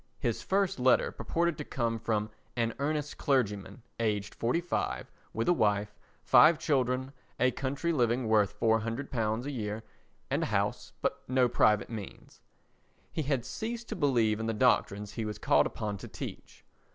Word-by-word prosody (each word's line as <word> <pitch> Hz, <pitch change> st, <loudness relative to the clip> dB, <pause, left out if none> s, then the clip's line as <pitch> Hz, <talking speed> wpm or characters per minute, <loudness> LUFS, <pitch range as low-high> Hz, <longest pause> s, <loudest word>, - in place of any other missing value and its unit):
His 120 Hz, -6 st, -1 dB
first 195 Hz, -6 st, 0 dB
letter 125 Hz, +1 st, +4 dB
purported 170 Hz, -2 st, -1 dB
to -, -, -2 dB
come 115 Hz, -5 st, -2 dB
from 110 Hz, -1 st, -1 dB, 0.2 s
"An 115 Hz, -2 st, 0 dB
Earnest 150 Hz, +1 st, -2 dB
Clergyman" 115 Hz, -4 st, 0 dB, 0.2 s
aged 105 Hz, -3 st, -1 dB
forty 120 Hz, +8 st, 0 dB
five, 175 Hz, 0 st, -2 dB, 0.2 s
with 115 Hz, +1 st, -2 dB
a 175 Hz, -, +6 dB
wife, 105 Hz, -6 st, +1 dB, 0.3 s
five 155 Hz, +1 st, +7 dB
children, 130 Hz, -3 st, 0 dB, 0.3 s
a 125 Hz, +2 st, +4 dB
country 140 Hz, +6 st, -2 dB
living 120 Hz, -3 st, +1 dB
worth 105 Hz, -2 st, +2 dB
£400 115 Hz, 0 st, 0 dB
a 145 Hz, -, -3 dB
year, 110 Hz, -3 st, -4 dB, 0.5 s
and -, -, +1 dB
a -, -, +1 dB
house, -, -, -1 dB
but -, -, 0 dB
no 130 Hz, -1 st, +3 dB
private 105 Hz, -2 st, +3 dB
means. 105 Hz, -4 st, -9 dB, 0.7 s
He 160 Hz, -, -1 dB
had 135 Hz, -5 st, -1 dB
ceased 235 Hz, +1 st, -5 dB
to -, -, -3 dB
believe 120 Hz, -, +2 dB
in 110 Hz, -, -2 dB
the 115 Hz, -, -1 dB
doctrines 105 Hz, -4 st, +2 dB
he 115 Hz, -, -3 dB
was 105 Hz, -1 st, -4 dB
called -, -, +3 dB
upon 105 Hz, -2 st, -4 dB
to -, -, -8 dB
teach. -, -, -9 dB
120 Hz, 165 wpm, -30 LUFS, 110-140 Hz, 0.7 s, five